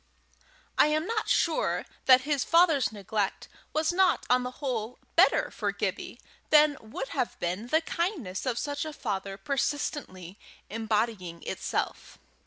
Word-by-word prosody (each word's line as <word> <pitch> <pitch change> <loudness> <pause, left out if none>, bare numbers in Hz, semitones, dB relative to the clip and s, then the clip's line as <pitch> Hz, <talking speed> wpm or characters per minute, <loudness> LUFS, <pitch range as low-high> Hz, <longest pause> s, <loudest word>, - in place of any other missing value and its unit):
I - - +7
am 310 +1 +1
not 450 +1 -2
sure 330 -2 +1 0.2
that 255 -1 +7
his 285 -1 0
father's 330 -7 +4
neglect 205 -1 -2 0.2
was 315 +2 +1
not 380 +1 +3
on 250 0 +5
the 250 - -3
whole 250 -4 -3 0.2
better - - +4
for - - -2
Gibbie - - -4 0.3
than 300 -1 +6
would 225 +5 -6
have 250 - -2
been 180 +6 -2
the 315 +6 +3
kindness 325 - -3
of 240 -2 0
such 285 +1 -2
a 310 -1 -5
father 195 -6 -4
persistently 210 - -3 0.3
embodying 215 -5 -2
itself. - - -3
255 Hz, 140 wpm, -28 LUFS, 210-305 Hz, 0.3 s, I